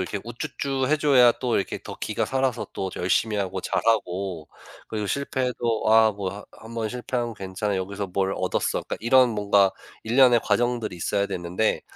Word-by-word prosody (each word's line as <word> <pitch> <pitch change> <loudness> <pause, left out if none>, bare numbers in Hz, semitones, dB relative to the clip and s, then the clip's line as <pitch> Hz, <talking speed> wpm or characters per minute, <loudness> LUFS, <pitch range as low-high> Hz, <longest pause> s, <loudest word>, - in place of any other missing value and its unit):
이렇게 95 +2 -3
우쭈쭈 130 +3 -3
해줘야 140 -5 +5
또 125 -2 -1
이렇게 95 - -2
더 - - -8
기가 - - -1
살아서 130 -2 -1
또 95 -1 -3
열심히 105 +4 +1
하고 95 -1 -2
잘하고 95 -8 -1 0.4
그리고 105 -2 -3
실패해도 125 -3 -1
"아 110 -1 +6
뭐 100 -2 -4
하 100 +1 -9
1 115 +1 -12
번 110 -2 -2
실패한 120 -1 -3
괜찮아. 95 +1 -3
여기서 100 +2 -3
뭘 95 +1 -1
얻었어." - - -1
그러니까 - - -5
이런 125 +2 +5
뭔가 100 -2 +3 0.3
일련의 120 0 +5
과정들이 115 -2 0
있어야 100 +4 0
되는데 90 +3 -1
110 Hz, 365 characters per minute, -25 LUFS, 95-120 Hz, 0.4 s, 아